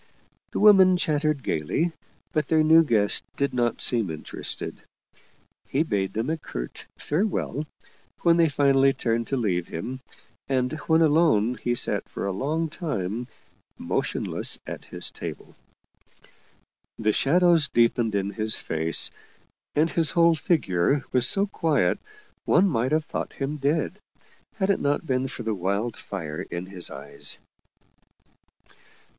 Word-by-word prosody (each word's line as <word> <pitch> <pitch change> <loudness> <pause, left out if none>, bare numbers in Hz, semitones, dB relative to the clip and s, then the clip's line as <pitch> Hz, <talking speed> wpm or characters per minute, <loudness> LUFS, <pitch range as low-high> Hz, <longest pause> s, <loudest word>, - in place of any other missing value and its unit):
The - - -3
women 190 -3 +7
chattered 155 -3 0
gayly, 80 - -1 0.4
but 155 -3 0
their 160 -1 +3
new 160 +1 +6
guest 105 -8 +2
did 140 0 -1
not 120 -2 0
seem 115 -6 +2
interested. 80 -1 -4 0.9
He 140 +4 +1
bade 95 - -2
them 115 +7 -1
a 160 - -2
curt - - -7
farewell 155 -3 -1 0.5
when 170 -1 +4
they 165 -2 +4
finally 135 -1 +3
turned 115 -2 -1
to 135 - -1
leave 90 -8 -1
him, 125 +11 -5 0.5
and 130 0 0
when 160 0 +4
alone 150 -8 +3
he 120 0 0
sat - - -1
for - - -5
a 100 - -1
long 155 - -1
time 120 - -4 0.5
motionless - - 0
at - - -7
his - - -2
table. - - -8 1.4
The 110 -1 +1
shadows 170 - +4
deepened 115 -3 +2
in 100 0 -1
his 110 +2 0
face, 80 -1 0 0.6
and 155 +2 +3
his 165 -3 +3
whole 170 0 +4
figure 140 - +1
was 125 -1 +3
so 195 +6 +3
quiet 165 -8 +1 0.5
one 200 - +4
might 130 -6 0
have 155 0 +1
thought - - -4
him 140 +2 -3
dead, 150 +7 -1 0.6
had 195 -2 +1
it - - 0
not 145 +3 0
been 130 -2 0
for 125 - -6
the 110 -1 -1
wild 100 +4 -2
fire 80 -6 -6
in 85 +1 -6
his 95 -2 -3
eyes. 70 +1 -4
135 Hz, 140 wpm, -25 LUFS, 105-160 Hz, 1.4 s, women